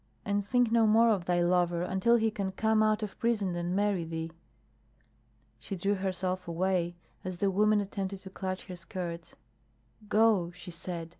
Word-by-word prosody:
And 205 0 0
think 245 +2 +2
no 230 -1 +4
more 225 +2 +5
of 195 -6 +1
thy 175 0 +2
lover 175 -1 +2
until 190 +6 +2
he 225 -1 +2
can 195 -2 -3
come 220 +2 +2
out 215 0 +2
of 205 - -6
prison 215 -6 0
and 175 +1 -2
marry 200 -3 +1
thee." 165 0 -5 1.3
She 155 - -6
drew 195 +3 0
herself 185 -1 -2
away 175 0 0 0.3
as 185 -1 -5
the 195 +1 +1
woman 210 +2 +3
attempted 195 -1 -3
to 190 - -10
clutch 190 -1 -4
her 185 - -7
skirts. 170 -1 -6 0.7
"Go," 210 -5 +4
she 180 0 -9
said. 170 -1 -5
190 Hz, 170 wpm, -30 LUFS, 175-210 Hz, 1.3 s, more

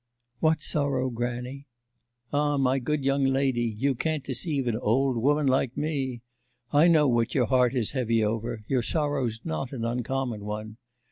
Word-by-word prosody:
'What 160 -1 +2
sorrow, 140 -4 0
grannie?' 125 +3 -4 0.7
'Ah, 145 0 +2
my 135 0 +2
good 145 +2 -2
young 135 0 +2
lady, 135 -2 +1
you 140 +4 +1
can't 155 +3 -2
deceive 135 +1 -2
an 115 - +1
old 130 +4 +1
woman 145 +6 +2
like 130 -1 +1
me. 135 -5 -2 0.5
I 150 +4 +6
know 155 -4 +5
what 120 -2 +1
your 125 -4 +3
heart 125 0 +2
is 120 -5 0
heavy 115 -4 +1
over; 110 +1 -2
your 130 -2 +1
sorrow's 135 -5 -1
not 80 +8 -3
an 115 -3 -3
uncommon 120 -1 -2
one. 105 +1 -5
130 Hz, 160 wpm, -27 LUFS, 120-140 Hz, 0.7 s, I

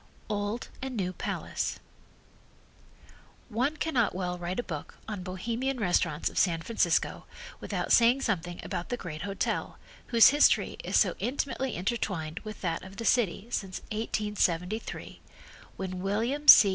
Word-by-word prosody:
Old 205 +3 -2
and 260 -2 -4
New 185 -2 -1
Palace - - -3 1.7
One 255 +7 0
cannot 250 - +1
well 180 -1 -2
write 175 +3 -3
a - - 0
book 155 -8 -7
on 210 -4 -4
Bohemian 230 +8 -2
restaurants 175 -5 +1
of - - -1
San 165 -3 +2
Francisco 230 - +1 0.3
without - - -3
saying 240 +3 +6
something 175 -5 -1
about 175 - -4
the 245 - -1
great 155 -7 -6
hotel 195 +2 -2 0.3
whose 230 -2 +8
history 290 +1 +4
is - - +1
so - - +4
intimately 265 -1 -2
intertwined 180 -5 -2
with 215 -1 -9
that 165 -3 -1
of 190 +1 -11
the 230 - -4
city 215 -5 +2
since 190 -4 -3
1873, 210 -3 -1 0.6
when 185 -1 -4
William 230 +10 -1
C. 205 - +11
205 Hz, 140 wpm, -29 LUFS, 180-235 Hz, 1.7 s, C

